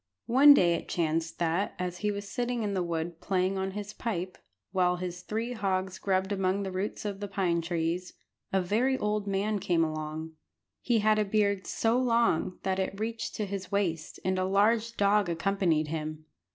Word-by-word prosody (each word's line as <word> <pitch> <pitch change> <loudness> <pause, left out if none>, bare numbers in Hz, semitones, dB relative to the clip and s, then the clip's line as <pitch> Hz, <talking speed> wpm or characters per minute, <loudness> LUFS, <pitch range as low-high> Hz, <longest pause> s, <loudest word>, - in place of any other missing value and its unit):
One 275 +5 +8
day 175 -8 +4
it - - -4
chanced 165 -1 -1
that, 170 +4 0
as 180 -1 -3
he 210 - 0
was 205 0 -4
sitting 240 +1 -2
in 205 -1 -1
the 190 - 0
wood 170 -1 -3
playing 190 0 0
on 190 0 -1
his 205 0 -5
pipe, 185 -6 -3 0.4
while 180 -2 +2
his 180 0 -5
three 225 +5 -3
hogs 190 -3 -1
grubbed 190 0 0
among 195 0 0
the 190 - -4
roots 190 +3 -3
of 200 -2 -3
the 205 - -4
pine 185 -4 0
trees, 170 +1 -2 0.4
a 190 -1 +2
very 245 +8 +1
old 210 -2 -1
man 200 +2 0
came 175 -3 +2
along. 155 0 -4 0.5
He 235 -3 +2
had 215 0 +3
a - - +3
beard 200 -1 +1
so 230 +2 +1
long 230 -8 +2
that 190 0 0
it 190 +1 -2
reached 225 +1 -3
to 210 - -1
his 195 -1 -5
waist, 170 -6 -1
and 185 0 +1
a 185 - +1
large 220 +4 +2
dog 200 -1 +3
accompanied 170 -3 +1
him. 155 0 -4
190 Hz, 190 wpm, -29 LUFS, 175-210 Hz, 0.5 s, One